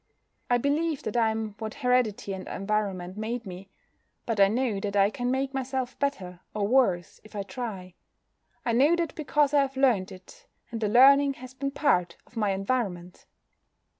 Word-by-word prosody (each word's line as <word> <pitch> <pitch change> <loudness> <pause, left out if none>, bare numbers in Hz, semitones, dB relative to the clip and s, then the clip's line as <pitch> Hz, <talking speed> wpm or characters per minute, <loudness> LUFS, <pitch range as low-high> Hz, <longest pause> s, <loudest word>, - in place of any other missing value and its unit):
I 245 - +4
believe 290 +4 0
that 215 - -4
I 230 -2 +3
am 220 -1 -3
what 220 0 -5
heredity 250 -7 +1
and 190 -1 -7
environment 195 -2 -2
made 230 +2 -3
me. 190 +1 -9 0.6
But 225 -3 -2
I 195 - +7
know 225 -1 0
that 200 0 -4
I 200 +1 +4
can 245 -1 -2
make 265 +1 -1
myself 260 -1 -3
better 190 -11 -2 0.2
or 205 -1 0
worse 205 -8 +1
if 215 - -15
I 200 - -2
try. 195 -6 -6 0.7
I 235 - +1
know 285 +8 +5
that 340 -3 -2
because 295 -2 +1
I 290 - +5
have 270 -1 -2
learnt 240 -9 +2
it, 485 - -14 0.2
and 230 -1 -4
the 215 - +1
learning 275 +4 +6
has 255 0 -11
been 275 +1 -3
part 180 - +1
of - - -24
my 215 -3 +1
environment. 195 -3 -3
230 Hz, 180 wpm, -27 LUFS, 195-265 Hz, 0.7 s, I